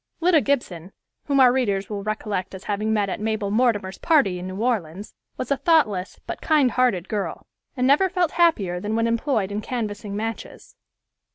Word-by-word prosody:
Lida 340 -2 +4
Gibson, 195 - -2 0.3
whom 280 -1 +1
our 250 -2 +6
readers 200 -7 0
will 205 -2 -5
recollect 210 -3 -3
as 190 - -10
having 210 +1 -2
met 210 -2 +1
at 190 - -4
Mabel 215 -2 -2
Mortimer's 210 -4 +1
party 275 - +2
in 180 - -6
New 185 - -6
Orleans, 205 -6 -2 0.2
was 255 - -5
a 280 - +2
thoughtless, 255 - +1
but - - -6
kind 295 -6 +3
hearted 215 -8 +1
girl, 200 -6 -4 0.3
and 250 - +1
never 295 +8 +4
felt 360 -3 0
happier 220 - +2
than 210 +4 -3
when 230 0 +1
employed 230 -3 0
in 205 +1 -3
canvassing 210 -3 -4
matches. 225 +2 -6
215 Hz, 180 wpm, -23 LUFS, 200-260 Hz, 0.3 s, our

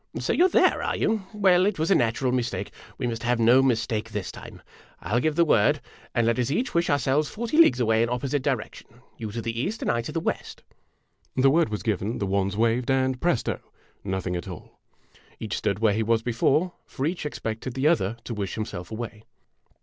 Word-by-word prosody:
"So - - 0
you 360 - +5
're - - -5
there, - - +3
are - - -1
you? 215 -4 0
Well, 190 -3 +4
it 205 - -1
was 160 +4 0
a - - +8
natural 120 0 +1
mistake! 115 -6 -2 0.3
We 130 - -3
must 115 -1 -3
have 120 0 +1
no 120 +3 +6
mistake 115 -3 0
this 105 -3 -4
time. - - -12 0.4
I - - -9
'11 120 +3 +3
give 155 +1 0
the 170 +1 +4
word, 105 -9 +3 0.4
and 120 - +3
let 115 +2 +1
us 125 0 0
each 240 - -1
wish 170 0 +1
ourselves 145 +1 +1
forty 235 +5 -4
leagues 330 - +6
away 110 -2 +3
in 115 - +1
opposite 130 +3 -1
directions - - -3 0.3
you 110 - -5
to 115 +1 -5
the 115 0 -3
east, 215 - -3
I 120 - +1
to 115 - -6
the 165 - -1
west." - - -4 0.7
The 135 +1 +4
word 165 -3 +3
was 105 -1 -4
given, 105 0 -1
the 100 - -2
wands 100 +1 0
waved, 115 +3 +1
and, 130 -1 +1
presto! 175 -8 0 0.4
nothing 95 -2 -2
at 85 - -5
all! 90 -4 -10 0.6
Each - - -3
stood 100 - -1
where 110 -1 +2
he 110 - 0
was 115 0 +1
before, 140 +9 +1
for 135 - -4
each 170 +3 -2
expected 120 -4 -4
the 135 +3 +2
other 115 - +1
to 120 - -5
wish 100 -3 -4
himself 95 -5 -5
away. 110 -1 -6
120 Hz, 215 wpm, -25 LUFS, 110-150 Hz, 0.7 s, a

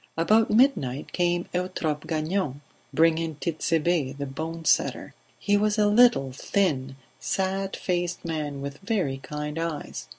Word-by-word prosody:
About 215 +7 +4
midnight 210 - +2
came 175 -1 +1
Eutrope 175 -4 -2
Gagnon, 155 -2 -1 0.3
bringing 160 +2 +2
Tit'Sebe 160 -1 0
the 140 - -3
bone 160 +4 -6
setter. - - +1 0.2
He 205 0 +2
was 210 +1 +1
a 210 - +4
little, 210 - +5
thin, 135 -3 -1 0.2
sad 195 0 -1
faced 175 -2 -2
man 150 -4 -3
with 140 +1 -6
very 195 - -1
kind 150 +2 -5
eyes. 165 -2 -4
165 Hz, 130 wpm, -26 LUFS, 145-190 Hz, 0.3 s, little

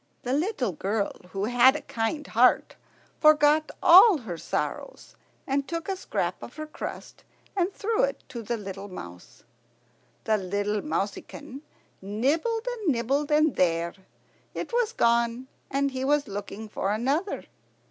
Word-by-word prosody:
The 250 - -1
little 290 - 0
girl, 200 +4 -1 0.2
who 195 +1 -2
had 245 +4 +5
a - - -3
kind 275 +4 -2
heart, 250 +1 +3 0.4
forgot 305 0 +5
all 370 +2 +9
her 220 -10 -6
sorrows, 170 - -4 0.3
and 275 0 -1
took 335 -1 -4
a 390 - -1
scrap 375 - -3
of - - -10
her 310 - -5
crust 305 - -8 0.3
and 370 0 +1
threw 445 +4 -1
it - - -1
to 235 - -6
the 235 +2 -3
little 195 -1 -7
mouse. 90 - -11 0.8
The 215 -1 +1 0.4
mouseykin 280 +2 -4 0.4
nibbled 300 - 0
and 445 -9 0
nibbled, 270 +5 0
and 305 -1 +3
there, 170 -1 +1 0.6
it - - -5
was 480 -2 +2
gone, 235 +2 +1 0.2
and 280 0 0
he 260 0 -3
was 290 +1 +2
looking 205 +2 -6
for 200 -1 -2
another. 275 - -1
265 Hz, 140 wpm, -26 LUFS, 215-310 Hz, 0.8 s, all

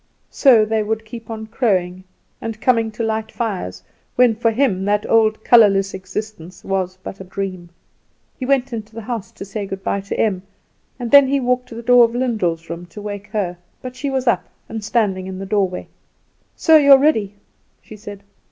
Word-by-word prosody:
So 240 -6 +5
they 220 0 0
would 220 +1 -3
keep 225 0 -10
on 220 -1 -5
crowing, 185 -6 -1 0.4
and 225 -1 -5
coming 230 -2 +2
to 230 - -4
light 220 0 -2
fires, 180 - -4 0.3
when 245 -2 +5
for 230 +1 +1
him 225 -5 +1
that 205 +1 0
old 220 -1 +2
colourless 195 -4 +5
existence 190 -1 -7
was 185 -1 -2
but 195 - -8
a - - -7
dream. 185 -2 -5 0.7
He - - -7
went 265 -1 +1
into 220 -1 -7
the 230 - -7
house 230 -2 -5
to - - -8
say 200 0 -5
good 195 0 -6
bye 200 - -1
to 200 - -5
Em, 195 -5 +1 0.6
and 245 -2 -5
then 280 -1 +8
he 275 +1 +1
walked 250 0 -1
to 230 - -9
the 235 - -7
door 245 0 +6
of 230 0 +1
Lyndall's 190 -10 -1
room 170 +1 -7
to 210 - -11
wake 205 -1 -6
her; 195 -5 -3 0.2
but 255 0 -7
she 280 +2 -3
was 265 -1 -1
up, 235 - +1 0.2
and 220 -1 -6
standing 205 -4 0
in 190 0 -6
the 195 - -6
doorway. 190 -2 -1 0.7
"So 320 -1 +5
you 280 -2 +7
are - - +9
ready," 220 -9 +1 0.5
she 215 - -12
said. 205 -1 -10
215 Hz, 200 wpm, -19 LUFS, 195-235 Hz, 0.7 s, are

